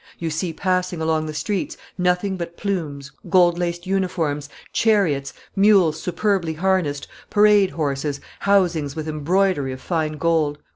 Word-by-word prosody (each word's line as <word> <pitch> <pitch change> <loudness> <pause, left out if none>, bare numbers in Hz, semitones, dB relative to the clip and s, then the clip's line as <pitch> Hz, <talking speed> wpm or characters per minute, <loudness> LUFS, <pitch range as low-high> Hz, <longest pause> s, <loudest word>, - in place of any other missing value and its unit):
"You 165 -1 -3
see 165 +3 -2
passing 185 0 -1
along 160 -1 0
the 155 - -5
streets 220 - -2 0.2
nothing 180 +2 +1
but 170 -1 -6
plumes, 150 -9 -3 0.2
gold 175 -1 +4
laced 175 0 -2
uniforms, 165 -7 -1 0.2
chariots, 170 -12 +2 0.2
mules 195 -6 +4
superbly 180 -2 0
harnessed, 165 -4 0 0.2
parade 210 -2 +5
horses, 145 -2 -2 0.2
housings 175 -8 +2
with 160 -1 -4
embroidery 155 -1 +1
of 130 - -8
fine 160 0 -1
gold." 155 -1 +1
170 Hz, 135 wpm, -22 LUFS, 155-190 Hz, 0.2 s, parade